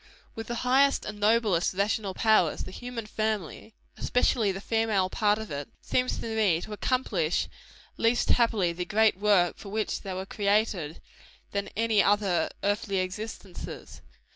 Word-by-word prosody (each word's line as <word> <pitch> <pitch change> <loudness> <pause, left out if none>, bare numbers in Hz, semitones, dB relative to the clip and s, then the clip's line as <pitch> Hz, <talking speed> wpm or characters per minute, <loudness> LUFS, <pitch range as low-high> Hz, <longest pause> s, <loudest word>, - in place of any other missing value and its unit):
With 225 -1 -7
the 240 - -3
highest 275 +2 +3
and 210 0 -6
noblest 210 -5 +2
rational 200 0 0
powers, 215 -8 +3
the - - -8
human 245 +1 -6
family 215 -1 -3 0.2
especially 230 -4 +2
the 190 - -5
female 215 -3 0
part 210 -1 +2
of 220 -4 -7
it 140 0 -5
seems 255 0 0
to 225 -1 -4
me 200 -7 +3
to 215 - -7
accomplish 205 -8 0 0.5
least 230 +1 +2
happily 215 -7 +2
the 180 +1 -3
great 215 +2 +3
work 200 -4 +3
for 200 - -10
which 215 +1 -2
they 190 -2 -5
were 190 +1 -4
created, 200 -6 0 0.5
than 200 0 -2
any 225 -2 +3
other 195 -5 +2
earthly 205 -1 0
existences. 190 0 -6
210 Hz, 150 wpm, -28 LUFS, 190-225 Hz, 0.5 s, highest